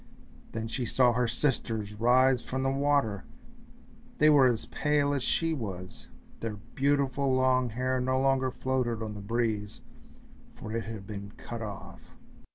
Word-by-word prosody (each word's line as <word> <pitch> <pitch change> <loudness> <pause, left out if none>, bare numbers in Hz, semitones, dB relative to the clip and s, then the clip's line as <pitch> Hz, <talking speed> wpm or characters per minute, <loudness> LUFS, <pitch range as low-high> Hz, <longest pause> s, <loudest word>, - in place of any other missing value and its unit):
Then 115 0 -3
she 125 +3 -3
saw 120 +1 +3
her 125 0 +1
sisters 115 -4 -1
rise 125 +3 +4
from 130 +1 -3
the 135 - +1
water, 140 -7 +1 0.9
they 155 0 +6
were 140 -3 +6
as 120 -3 0
pale 145 -1 +1
as 140 - -1
she 165 +5 +1
was, 95 - -6 0.3
their 115 -2 -4 0.2
beautiful 140 0 +1
long 130 -1 +3
hair 130 +3 -1
no 130 +1 +1
longer 135 -1 +2
floated 125 -3 -1
on 110 -1 -5
the 105 - -8
breeze, 110 -1 -2 0.7
for 105 - -8
it 115 - -2
had 110 -3 -7
been 100 0 -7
cut 115 -1 -7
off. 100 -4 -9
125 Hz, 155 wpm, -29 LUFS, 110-135 Hz, 0.9 s, they